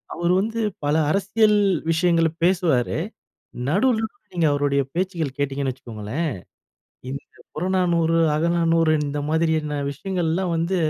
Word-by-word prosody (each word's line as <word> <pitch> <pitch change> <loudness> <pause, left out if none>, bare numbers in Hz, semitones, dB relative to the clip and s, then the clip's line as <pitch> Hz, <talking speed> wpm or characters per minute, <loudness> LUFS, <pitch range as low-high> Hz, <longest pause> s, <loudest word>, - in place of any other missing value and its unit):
அவரு 175 +1 +1
வந்து 225 +2 -3 0.3
பல 145 - +2 0.2
அரசியல் 210 +2 +3 0.3
விஷயங்கள 165 0 +3 0.2
பேசுவாரு. 170 -10 +2 0.7
நடுவுலருந்து 220 - +1 0.2
நீங்க 165 -2 +3
அவருடைய 145 -1 +1
பேச்சுகள் 170 -6 -2
கேட்டீங்கன்னு 140 -1 -1
வச்சுக்கோங்களேன். 115 +6 -4 0.8
இந்த 140 +1 -5 0.3
புறநானூறு, 170 -1 +1 0.2
அகநானூறு 165 0 +2
இந்த 145 +1 -3
மாதிரியான 160 -2 0
விஷயங்கள்லாம் 175 +2 -1
வந்து 170 +3 0
165 Hz, 105 wpm, -23 LUFS, 145-185 Hz, 0.8 s, அரசியல்